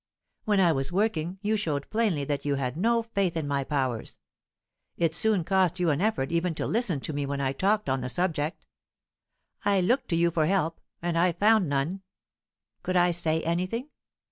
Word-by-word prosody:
When 210 -2 +2
I 175 -3 +5
was 135 -1 -1
working, 180 -3 0
you 215 +1 +1
showed 150 -9 -2
plainly 215 -10 +1
that 140 0 -2
you 145 -1 0
had 130 -2 -2
no 230 +6 +2
faith 200 -6 -1
in 155 -3 -2
my 140 -1 0
powers; 130 -5 -2 0.8
it 165 -2 +1
soon 205 +1 +2
cost 185 0 +2
you 175 -3 +2
an 145 +3 0
effort 210 -10 0
even 170 0 0
to - - -3
listen 210 - 0
to 155 - -4
me 145 -1 -2
when 140 0 -3
I 135 -1 0
talked 205 +6 +1
on 130 0 0
the 125 - -3
subject. 160 -1 -1 1.0
I 200 -1 +3
looked 250 +8 +1
to 170 - +1
you 170 +1 +3
for 155 -2 +1
help, 165 -3 0 0.2
and 170 -1 0
I 180 +1 +4
found 210 -2 +3
none. 145 +8 -1 0.8
Could 185 0 0
I 175 0 +4
say 160 -2 0
anything? 185 - -2
170 Hz, 195 wpm, -27 LUFS, 145-195 Hz, 1.0 s, I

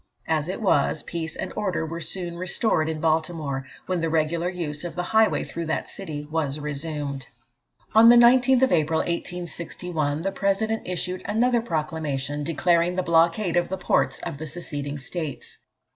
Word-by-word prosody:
As 155 0 0
it 190 - -4
was, 150 -5 +2
peace 165 -2 -4
and - - -5
order 190 -6 -1
were 165 +1 -5
soon 175 0 -5
restored 175 -2 0
in 160 -1 -3
Baltimore, 155 -4 -1 0.2
when 185 -2 -1
the 165 - 0
regular 165 +2 +1
use 165 -5 -4
of 170 -2 -5
the 180 - -1
highway 220 +3 +3
through 170 -1 -5
that 160 - -2
city 155 -7 -6
was 155 -3 -1
resumed. 145 -2 -4 0.7
On 225 +1 +8
the 240 - +9
19th 255 +2 +6
April, 160 0 +2
1861, 170 -3 -3
the 195 - 0
President 220 +3 0
issued 180 0 -2
another 240 +3 +2
proclamation, 150 - -2
declaring 170 +3 +2
the 185 - 0
blockade 170 +3 +3
of 175 0 +2
the 190 - -2
ports 180 - +1
of 140 - -5
the 160 - -5
seceding 145 -3 -5
states. 145 +2 -6
170 Hz, 160 wpm, -25 LUFS, 155-185 Hz, 0.7 s, the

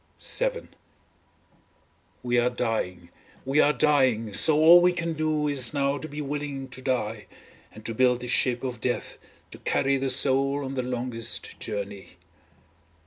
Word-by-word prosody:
VII - - -1 1.6
We 120 0 +1
are 120 +1 +2
dying, 110 -8 -3 0.4
we 135 +3 +3
are 145 - +4
dying, 130 -9 +1
so 150 +8 +5
all 170 +3 +8
we 180 0 +3
can 170 -1 -3
do 155 -1 -1
is 140 -2 +1
now 140 0 0
to 155 - -7
be 150 +1 -6
willing 140 -2 -5
to 130 +1 -9
die, 115 -5 -2 0.4
and 110 +1 -14
to 115 - -3
build 125 +1 +2
the 125 - -6
ship 120 0 +1
of 125 -3 -5
death 125 -1 -3 0.3
to - - -12
carry 135 0 0
the 135 0 -2
soul 135 +2 +2
on 135 - -5
the 130 - -1
longest 120 -2 -5
journey. 100 -2 -6
130 Hz, 155 wpm, -26 LUFS, 120-145 Hz, 1.6 s, all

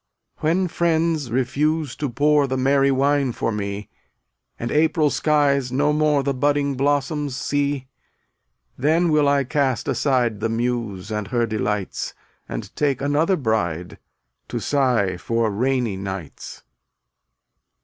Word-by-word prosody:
258 165 +4 +1
When 185 - +1
friends 165 -5 0
refuse 145 +3 0
to 145 - -2
pour 145 +3 +3
The 130 0 -2
merry 135 +1 +3
wine 140 0 +2
for 115 - -1
me, 100 -1 -4 0.7
And 120 - -4
April 155 -1 +2
skies 140 -4 +2
no 145 +3 +2
more 150 -2 +2
The 140 0 0
budding 140 +1 +1
blossoms 145 +1 0
see, 140 -1 -1 0.9
Then 160 +5 +2
will 150 -1 +3
I 140 -1 +3
cast 130 -3 0
aside 125 -6 +1
The 115 - -1
Muse 115 -4 -2
and 105 -2 -2
her 120 +1 +1
delights, 105 -3 -3 0.3
And - - -6
take 145 -3 +1
another 145 +6 +2
bride 90 - -2 0.5
To - - -3
sigh 125 -10 +1
for 115 +3 0
rainy 120 -1 0
nights. 95 -5 -7
135 Hz, 130 wpm, -22 LUFS, 115-145 Hz, 0.9 s, pour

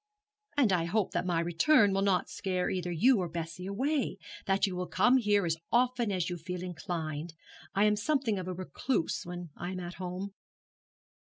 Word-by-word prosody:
'And 240 -9 +4
I 170 -2 +2
hope 195 +3 0
that 180 +1 -1
my 170 -2 +1
return 195 - +4
will 195 - +1
not 195 -2 +2
scare 185 -2 -2
either 180 -1 -2
you 225 +8 +4
or 180 -2 -2
Bessie 170 +2 -5
away; 265 +8 0 0.3
that 195 0 +3
you 190 -2 -3
will 180 0 -3
come 250 +1 +4
here 205 -5 +2
as 165 -1 0
often 240 -2 +2
as 180 -3 0
you 175 - -3
feel 180 +2 -5
inclined. 165 -3 -4 0.4
I 200 - +4
am 210 0 +4
something 230 -2 0
of 185 - -5
a 185 - -2
recluse 185 +1 -2
when 175 -2 -6
I 175 - -5
am 185 - -4
at 175 0 -6
home.' 185 +2 -4
185 Hz, 190 wpm, -31 LUFS, 175-210 Hz, 0.4 s, And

